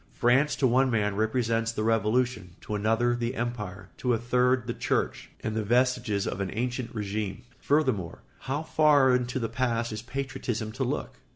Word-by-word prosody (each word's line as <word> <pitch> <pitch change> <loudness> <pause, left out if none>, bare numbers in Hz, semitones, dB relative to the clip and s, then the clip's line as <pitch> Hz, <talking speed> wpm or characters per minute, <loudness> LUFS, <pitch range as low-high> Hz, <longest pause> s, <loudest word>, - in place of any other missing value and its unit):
France 130 +5 +3
to 135 - +1
one 130 +2 +4
man 105 -4 +1
represents 115 +1 +1
the 110 -2 -3
Revolution, 110 -3 +1
to - - -6
another 115 +4 +2
the 120 +1 -2
Empire, 105 -6 -4
to 125 -2 +1
a - - 0
third 125 +1 +2
the 120 - -2
Church, - - -1
and 110 - -2
the 110 - 0
vestiges 120 -3 +1
of - - -3
the 100 - 0
ancien 125 +1 -1
régime. 105 -2 -4 0.2
Furthermore, 130 - 0 0.3
how 145 +4 -1
far 145 -5 +4
into 125 0 -1
the 115 -3 -1
past 120 -2 -1
is 110 0 -4
patriotism 120 -3 -4
to 130 +4 -3
look? 125 - -3
120 Hz, 175 wpm, -28 LUFS, 110-125 Hz, 0.3 s, one